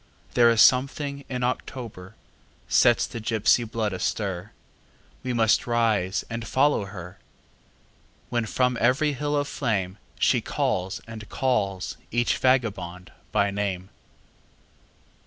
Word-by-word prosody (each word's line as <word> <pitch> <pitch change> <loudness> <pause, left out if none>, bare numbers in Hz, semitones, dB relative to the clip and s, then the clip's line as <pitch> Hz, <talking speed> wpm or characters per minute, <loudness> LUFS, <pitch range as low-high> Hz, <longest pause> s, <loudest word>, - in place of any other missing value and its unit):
There 120 -1 +6
is 115 -1 +6
something 140 +2 +2
in 125 -2 -3
October 115 -6 -4 0.5
sets 120 - +4
the 115 - -7
gipsy 110 +2 +2
blood 110 -2 -2
astir; 95 0 -3 0.7
We 130 - -3
must 115 -1 +2
rise 110 -6 +1
and 115 0 -5
follow 135 -6 +2
her, 95 -1 -9 1.1
When 120 -2 -1
from 125 0 +1
every 140 +5 +3
hill 145 +2 -1
of 145 0 0
flame 95 -6 -2 0.2
She - - +3
calls 95 +1 -1
and 110 -2 -9
calls 105 -8 -1
each 120 +1 +1
vagabond 95 -9 0 0.2
by 100 -1 +2
name. 100 -2 -3
115 Hz, 120 wpm, -25 LUFS, 100-125 Hz, 1.1 s, There